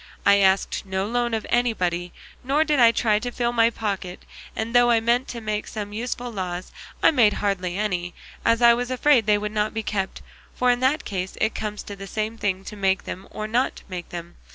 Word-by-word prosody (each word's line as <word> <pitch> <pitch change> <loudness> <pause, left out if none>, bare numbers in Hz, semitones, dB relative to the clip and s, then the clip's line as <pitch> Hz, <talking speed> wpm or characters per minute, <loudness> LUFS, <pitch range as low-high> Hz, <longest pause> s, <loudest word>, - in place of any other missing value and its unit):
I 200 - +6
asked 195 -1 +2
no 190 0 -2
loan 240 +1 0
of 220 - -4
anybody, 180 -8 0 0.3
nor 280 +5 +2
did 300 -3 +1
I 235 -1 +7
try 220 -2 +2
to 245 - -4
fill 240 0 -1
my 230 -1 +4
pocket; 195 -5 -4 0.3
and 225 +1 -3
though 245 0 +5
I 230 -1 +5
meant 235 +3 +1
to 235 - -6
make 215 -1 -3
some 205 -1 -6
useful 245 +2 -4
laws, 185 -3 -5 0.3
I - - +7
made 230 -8 +4
hardly 185 -3 -1
any, 180 -4 -2 0.3
as 230 +1 +2
I 235 0 +8
was 245 +1 -2
afraid 255 -3 +3
they 210 -1 +5
would 210 0 -3
not 215 0 -1
be 220 - -2
kept; 195 -3 -3 0.3
for 250 0 +3
in 245 - +1
that 265 +5 +1
case 185 -1 -4
it 220 0 +1
comes 210 -1 -4
to 205 - -8
the 195 0 -9
same 215 +3 -3
thing 195 -4 -2
to 210 - -8
make 195 -1 +1
them 190 - -7
or 215 0 -5
not 240 +4 +1
to - - -13
make 180 -2 -6
them. 170 0 -8
215 Hz, 225 wpm, -24 LUFS, 195-240 Hz, 0.3 s, I